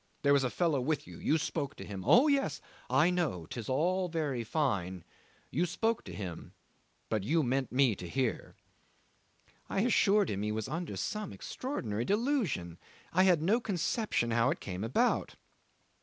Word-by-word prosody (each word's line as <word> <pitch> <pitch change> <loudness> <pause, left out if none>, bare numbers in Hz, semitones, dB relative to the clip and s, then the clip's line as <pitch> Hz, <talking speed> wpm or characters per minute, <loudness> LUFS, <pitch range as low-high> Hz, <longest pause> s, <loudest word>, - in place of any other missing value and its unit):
There 140 0 +5
was 140 -1 +4
a 130 - +1
fellow 160 -2 +1
with 145 +2 -1
you. - - -11
You 155 - +2
spoke 140 -2 -3
to - - -8
him 95 -2 -6
oh 255 +6 +7
yes 280 -2 +1 0.3
I 165 +4 +4
know; 165 - -1
'tis 115 +5 -6
all 180 +7 +1
very 150 -7 -1
fine. 100 - -1 0.5
You 175 +6 +1
spoke 225 +6 0
to - - -8
him, 90 -5 -7 0.5
but 110 -3 -1
you 155 +9 +2
meant 130 +1 0
me 125 -3 +3
to 90 - -7
hear... 130 +1 -2 0.5
." - - -36
'I 195 - 0
assured 210 -3 +3
him 100 0 -2
he 105 +1 -1
was 110 0 -3
under 165 +1 -4
some 210 -1 -3
extraordinary 115 - -4
delusion. 205 - 0 0.3
I 185 +2 +5
had 175 -5 +4
no 210 +8 +3
conception 195 - 0
how 115 +2 +3
it 160 - -1
came 95 +1 -5
about. 115 +3 +1
145 Hz, 170 wpm, -31 LUFS, 115-185 Hz, 0.5 s, oh